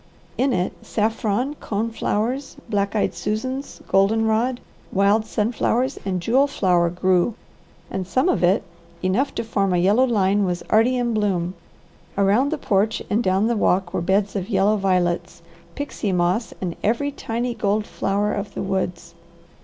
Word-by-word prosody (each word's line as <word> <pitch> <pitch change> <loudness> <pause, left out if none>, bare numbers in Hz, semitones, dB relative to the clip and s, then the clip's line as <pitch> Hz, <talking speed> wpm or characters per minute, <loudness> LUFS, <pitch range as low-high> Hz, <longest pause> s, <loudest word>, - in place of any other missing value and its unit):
In 265 +2 +1
it 180 -5 0
saffron, 225 +4 0
cone 220 +2 -2
flowers, 240 +5 -2
black 200 -2 -1
eyed 210 - +1
Susans, 260 +6 -4
golden 210 +4 +3
rod, 235 +3 +1 0.3
wild 200 +3 +3
sunflowers, 235 +4 0
and 190 -2 -1
jewel 250 +10 +3
flower 180 -8 +2
grew, 180 +4 +1 0.6
and 185 -2 -3
some 260 - +1
of 365 - +1
it, 180 +3 +3 0.4
enough 200 +10 +1
to - - -1
form 200 -4 0
a - - +3
yellow 205 +9 +4
line, 205 -3 +2
was 180 -2 -2
already 235 +4 +4
in 240 -1 0
bloom. 185 -5 0 0.6
Around 205 +8 +3
the 315 - -1
porch 210 -5 0
and 215 +3 +2
down 190 +2 +2
the 235 +1 +1
walk 190 -3 +1
were - - 0
beds 195 +3 +1
of 195 +1 -3
yellow 200 0 +3
violets, 180 -4 0 0.3
pixie 285 -7 -3
moss, 180 +5 +1
and 175 -3 -3
every 240 +7 +1
tiny 240 -1 -3
gold 210 -1 0
flower 205 +1 -1
of 200 0 -5
the - - -3
woods. 185 -3 -3
205 Hz, 160 wpm, -22 LUFS, 190-230 Hz, 0.6 s, yellow